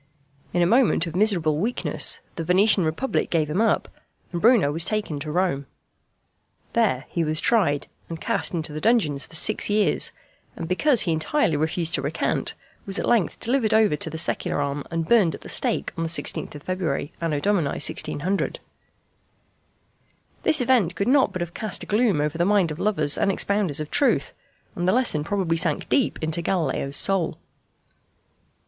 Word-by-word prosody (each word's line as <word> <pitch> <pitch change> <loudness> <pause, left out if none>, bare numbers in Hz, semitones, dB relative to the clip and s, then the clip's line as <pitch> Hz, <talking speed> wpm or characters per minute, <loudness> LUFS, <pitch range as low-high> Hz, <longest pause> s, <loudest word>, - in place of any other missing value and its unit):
In 175 0 +1
a - - +3
moment 230 -3 +3
of 165 -1 -7
miserable 175 -7 +2
weakness 230 +7 0
the 165 - -4
Venetian 190 +3 +4
republic 160 +13 -1
gave 155 -3 0
him 185 +7 0
up, 225 - +1 0.4
and 170 -1 -4
Bruno 220 - +4
was 160 +2 0
taken 210 -8 -2
to 150 +1 -5
Rome. 165 -5 -1 1.1
There 200 - +1
he 170 - -1
was 155 0 0
tried, 170 -12 +1 0.2
and 165 -1 -6
cast - - -1
into 160 -3 -4
the 155 - -5
dungeons 155 -12 +1
for - - -7
six 215 +6 +1
years, 210 0 +2 0.4
and 165 - -6
because 235 - +3
he 170 - 0
entirely 160 - 0
refused 160 +2 0
to - - +2
recant, 145 +4 -2 0.3
was 195 0 0
at - - -1
length 225 -9 +1
delivered 235 -3 +1
over 215 -7 +4
to 155 - -3
the 160 - -6
secular 160 - -2
arm 140 0 -2
and 165 -1 -3
burned 200 -10 +3
at - - -13
the - - -10
stake - - -1
on 165 - -2
16th 160 -2 -2
February, 170 -5 -3
Anno 160 -3 -1
Domini 180 -4 +1
1600. 185 +6 -1 1.8
This 300 - +3
event 235 -9 +2
could 200 - -2
not 275 0 +4
but 185 - -5
have 170 0 -9
cast 215 -4 -3
a - - -7
gloom 210 -6 +1
over 150 +2 -2
the - - +3
mind 195 -3 +2
of 155 - -7
lovers 155 -9 +1
and 195 - +2
expounders 195 -7 +1
of 155 0 -5
truth, 285 - +1 0.4
and 175 0 -2
the 185 - +3
lesson 235 -12 +2
probably 180 -2 -1
sank 165 -3 0
deep 270 - +1
into 160 +2 -1
Galileo's 155 -6 -2
soul. 190 -4 +1
175 Hz, 175 wpm, -23 LUFS, 155-210 Hz, 1.8 s, Venetian